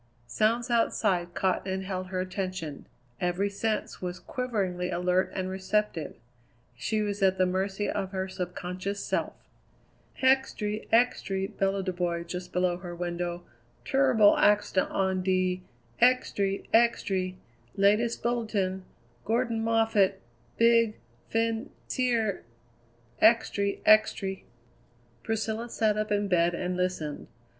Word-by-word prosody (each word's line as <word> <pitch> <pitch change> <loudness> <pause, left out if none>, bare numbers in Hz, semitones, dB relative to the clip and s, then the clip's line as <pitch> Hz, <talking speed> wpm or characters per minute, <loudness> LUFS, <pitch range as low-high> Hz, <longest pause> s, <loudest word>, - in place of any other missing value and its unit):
Sounds 230 - +1
outside 190 -6 +1
caught 190 0 0
and 190 0 -2
held 185 -1 -4
her 185 0 -3
attention; 185 -5 -4 0.3
every 180 +3 0
sense 215 +2 -2
was 180 0 -4
quiveringly 195 -8 -2
alert 180 +1 +1
and 185 -1 -2
receptive; 190 -3 -1 0.6
she 215 - -1
was 205 -1 -3
at 190 -1 +3
the 185 - +3
mercy 190 +2 -1
of 195 -2 -2
her 190 -1 -2
subconscious 185 +2 -4
self. - - -1 0.9
"Extry! 250 -5 +1
extry!" 200 -5 +2
bellowed 195 -1 -1
a 185 - 0
boy 175 -1 -1
just 180 +1 -6
below 180 -1 +1
her 175 -1 -8
window; 175 0 -3 0.4
"turribul 260 -6 +4
accident 205 -2 +3
on 190 -1 0
de 185 0 +1 0.4
extry! 205 -6 +2
extry! 190 -5 +2 0.4
Latest 210 +4 +2
bulletin 215 -6 -1 0.4
Gordan 230 0 0
Moffatt 225 -3 +2 0.4
big 230 -1 +4 0.3
fin 225 0 0 0.2
cier 230 -6 0 0.8
extry! 210 -3 +3
extry!" 200 -3 +3 0.8
Priscilla 225 +1 -2
sat 220 -2 +1
up 215 0 -2
in 205 0 +1
bed 175 -2 +2
and 180 +1 -2
listened. 180 -5 -2
195 Hz, 115 wpm, -28 LUFS, 185-220 Hz, 0.9 s, turribul